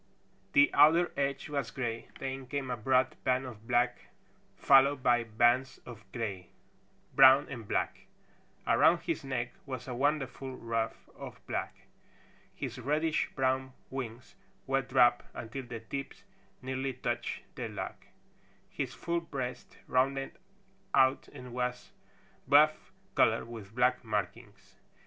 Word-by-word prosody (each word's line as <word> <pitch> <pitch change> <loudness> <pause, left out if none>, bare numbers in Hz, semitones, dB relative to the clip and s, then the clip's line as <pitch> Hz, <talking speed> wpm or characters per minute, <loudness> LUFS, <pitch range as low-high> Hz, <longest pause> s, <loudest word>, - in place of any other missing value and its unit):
The 285 0 +6
outer 160 +4 +6
edge 140 -1 -1
was 140 -5 -2
gray, 115 -3 -4
then 135 -1 -5
came 135 -1 -3
a - - 0
broad 130 +3 +2
band 130 +1 +1
of 115 -3 -10
black, 120 0 +1 0.5
followed 135 0 +5
by 120 -1 +4
bands 120 +4 +2
of 110 -5 -12
gray, 100 -6 -4 0.6
brown 135 +1 +8
and 115 -6 -7
black. - - -2 0.6
Around - - +4
his - - -3
neck 120 -3 -3
was 130 -2 -6
a 125 - -4
wonderful 135 -1 -1
ruff 115 -2 -3
of - - -9
black. - - -4 0.7
His - - -5
reddish 150 +5 0
brown 130 0 0 0.2
wings 125 -2 -6 0.3
were 135 0 +1
dropped 125 -2 +3
until 125 +3 -6
the 115 -2 -6
tips 135 +4 -7 0.4
nearly 130 +1 -2
touched 120 -1 -3
the - - -5
log. - - -5 0.8
His - - -4
full 170 0 -1
breast 130 -6 -6
rounded 135 +1 +1 0.6
out 130 +1 +4
and 125 -1 -11
was 125 0 -3 0.6
buff 150 +3 +4 0.2
color - - +3
with 110 -3 -10
black 125 +1 +2
markings. 105 0 -5
130 Hz, 130 wpm, -31 LUFS, 120-135 Hz, 0.8 s, brown